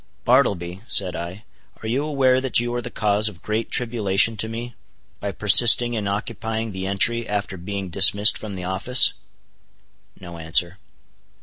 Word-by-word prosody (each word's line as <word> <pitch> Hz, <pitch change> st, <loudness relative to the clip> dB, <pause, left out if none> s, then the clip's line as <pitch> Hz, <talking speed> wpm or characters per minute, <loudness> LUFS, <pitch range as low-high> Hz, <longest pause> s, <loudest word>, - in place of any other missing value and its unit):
"Bartleby," 100 Hz, -8 st, 0 dB
said 90 Hz, -2 st, +1 dB
I, 85 Hz, +5 st, -8 dB, 0.4 s
"are -, -, -6 dB
you 130 Hz, +6 st, -2 dB
aware 135 Hz, -4 st, +1 dB
that 130 Hz, -3 st, +1 dB
you 120 Hz, 0 st, -3 dB
are 120 Hz, -, -3 dB
the -, -, -7 dB
cause 105 Hz, 0 st, 0 dB
of 90 Hz, -5 st, -17 dB
great 110 Hz, +1 st, -4 dB
tribulation 115 Hz, -3 st, +1 dB
to 110 Hz, +2 st, -2 dB
me, 120 Hz, +2 st, -8 dB, 0.5 s
by 100 Hz, -, -5 dB
persisting 120 Hz, +5 st, +5 dB
in 105 Hz, -3 st, -4 dB
occupying 110 Hz, +2 st, -5 dB
the 95 Hz, 0 st, -6 dB
entry 115 Hz, +4 st, 0 dB
after 105 Hz, -1 st, -4 dB
being 95 Hz, +1 st, -7 dB
dismissed 100 Hz, +4 st, +5 dB
from 105 Hz, -3 st, -8 dB
the 90 Hz, -, -8 dB
office?" 95 Hz, +8 st, +2 dB, 1.1 s
No 85 Hz, -2 st, -11 dB
answer. 85 Hz, +4 st, 0 dB
105 Hz, 160 wpm, -21 LUFS, 95-115 Hz, 1.1 s, persisting